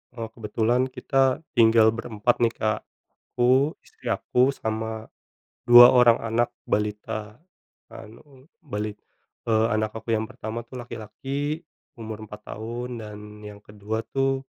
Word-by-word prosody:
Oh, 115 Hz, -1 st, -6 dB
kebetulan 115 Hz, +3 st, 0 dB
kita 135 Hz, +2 st, +1 dB
tinggal 115 Hz, -3 st, +5 dB
berempat 115 Hz, +1 st, -1 dB
nih, 115 Hz, -1 st, +2 dB
Kak. 110 Hz, 0 st, 0 dB, 0.6 s
Aku, 130 Hz, +5 st, +3 dB
istri -, -, -14 dB
aku, 130 Hz, +2 st, +1 dB
sama 110 Hz, 0 st, -4 dB, 0.5 s
2 120 Hz, +1 st, +9 dB
orang 120 Hz, -2 st, +6 dB
anak 115 Hz, +1 st, 0 dB, 0.2 s
balita. 105 Hz, +1 st, -3 dB, 0.5 s
Anu, 130 Hz, +6 st, -14 dB
balit 105 Hz, -, -5 dB, 0.5 s
eee, 110 Hz, 0 st, +3 dB
anak 110 Hz, 0 st, -1 dB
aku 110 Hz, +1 st, -6 dB
yang 110 Hz, 0 st, +1 dB
pertama 115 Hz, +2 st, -7 dB
tuh 130 Hz, -, -14 dB
laki-laki 135 Hz, +7 st, -5 dB, 0.3 s
umur 110 Hz, -2 st, -8 dB
4 105 Hz, +1 st, -11 dB
tahun 120 Hz, +2 st, -5 dB
dan 105 Hz, -1 st, -8 dB, 0.3 s
yang 105 Hz, 0 st, -11 dB
kedua 105 Hz, +2 st, -5 dB
tuh 135 Hz, +1 st, -1 dB
115 Hz, 130 wpm, -25 LUFS, 110-125 Hz, 0.6 s, 2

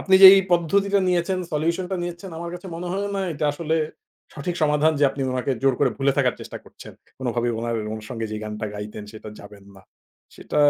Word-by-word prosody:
আপনি 190 Hz, -, +3 dB
যে -, -, +14 dB
এই -, -, +6 dB
পদ্ধতিটা 195 Hz, +4 st, +2 dB
নিয়েছেন, 180 Hz, +1 st, +1 dB
solution 165 Hz, +4 st, 0 dB
টা 190 Hz, -, -1 dB
নিয়েছেন 175 Hz, +2 st, -6 dB
আমার 170 Hz, 0 st, -5 dB
কাছে 180 Hz, +2 st, -9 dB
মনে 175 Hz, +2 st, -5 dB
হলো 200 Hz, +2 st, -1 dB
না -, -, -1 dB
এটা 150 Hz, -, -3 dB
আসলে 160 Hz, +1 st, -2 dB, 0.6 s
সঠিক 155 Hz, +4 st, -3 dB
সমাধান 150 Hz, +1 st, +3 dB
যে -, -, +6 dB
আপনি 135 Hz, 0 st, -4 dB
উনাকে 130 Hz, +1 st, -1 dB
জোর 135 Hz, -1 st, +4 dB
করে -, -, +4 dB
ভুলে 135 Hz, 0 st, +2 dB
থাকার 130 Hz, -3 st, +3 dB
চেষ্টা -, -, -7 dB
করছেন। -, -, -13 dB, 0.3 s
কোনভাবেই 120 Hz, -2 st, -1 dB
উনার 115 Hz, 0 st, -2 dB, 0.2 s
অনুসঙ্গে 110 Hz, +1 st, -6 dB
যে 110 Hz, -, -3 dB
গানটা 105 Hz, 0 st, -4 dB
গাইতেন 105 Hz, 0 st, -7 dB
সেটা 110 Hz, 0 st, -9 dB
যাবেন 100 Hz, -1 st, -13 dB
না। 95 Hz, -, -15 dB, 0.5 s
সেটা -, -, -6 dB
150 Hz, 200 wpm, -23 LUFS, 120-175 Hz, 0.6 s, যে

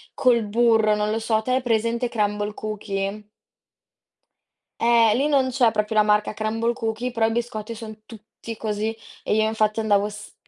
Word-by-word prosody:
col 240 Hz, -3 st, +3 dB
burro, 220 Hz, 0 st, +3 dB
non 210 Hz, 0 st, -1 dB
lo 225 Hz, -, -1 dB
so. 220 Hz, -1 st, +1 dB
Te 255 Hz, -, -2 dB
hai 260 Hz, +1 st, +2 dB
presente 235 Hz, 0 st, 0 dB
Crumbl 210 Hz, -1 st, -1 dB
Cookies? 205 Hz, -1 st, -4 dB, 1.6 s
Eh, 230 Hz, -2 st, +5 dB
lì 280 Hz, +4 st, +1 dB
non 270 Hz, -3 st, +2 dB
c'è 245 Hz, -2 st, +3 dB
proprio 215 Hz, 0 st, -1 dB
la -, -, +7 dB
marca 210 Hz, 0 st, +1 dB
Crumbl 225 Hz, +2 st, -1 dB
Cookies 235 Hz, +1 st, -3 dB
però 225 Hz, -2 st, +2 dB
i -, -, -1 dB
biscotti 230 Hz, -1 st, -4 dB
son 220 Hz, -1 st, -9 dB
tutti 225 Hz, 0 st, -10 dB
così. 215 Hz, +1 st, -2 dB, 0.3 s
E -, -, 0 dB
io, 220 Hz, -, +3 dB
infatti, 215 Hz, 0 st, 0 dB
andavo, 205 Hz, -2 st, +2 dB
s 210 Hz, 0 st, -11 dB
220 Hz, 170 wpm, -23 LUFS, 210-235 Hz, 1.6 s, la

